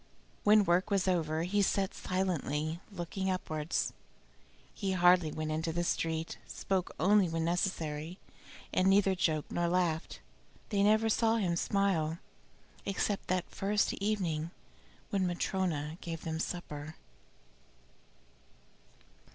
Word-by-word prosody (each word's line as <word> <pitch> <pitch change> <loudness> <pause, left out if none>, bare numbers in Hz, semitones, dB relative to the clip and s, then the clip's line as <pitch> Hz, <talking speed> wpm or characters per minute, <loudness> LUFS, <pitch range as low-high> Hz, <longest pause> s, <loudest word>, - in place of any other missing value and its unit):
When 210 0 +6
work 175 +2 +2
was 195 -2 +1
over 160 -3 +1
he 200 +4 +1
sat 195 0 +1
silently, 165 -4 -1
looking 190 +1 -3
upwards. 155 -4 -1 0.8
He 195 -2 -2
hardly 175 -3 +5
went 155 0 -3
into 160 +1 -1
the 175 +2 -1
street, 165 -1 -1
spoke 190 -2 -2
only 195 +2 +4
when 165 0 -1
necessary, 165 -2 -1 0.6
and 185 - +3
neither 195 0 +5
joked 160 -5 0
nor 175 0 +1
laughed. 170 -2 0 0.5
They 200 -2 +1
never 215 +2 +4
saw 225 +1 +3
him 185 -6 +1
smile, 170 -4 +1 0.7
except 200 +1 -1
that 185 -1 -1
first 205 +1 +1
evening 180 -7 -1 0.6
when 195 -2 +1
Matryona 175 -3 -1
gave 165 -2 -5
them 160 -1 -3
supper. 155 -3 -5
180 Hz, 120 wpm, -32 LUFS, 160-195 Hz, 0.8 s, When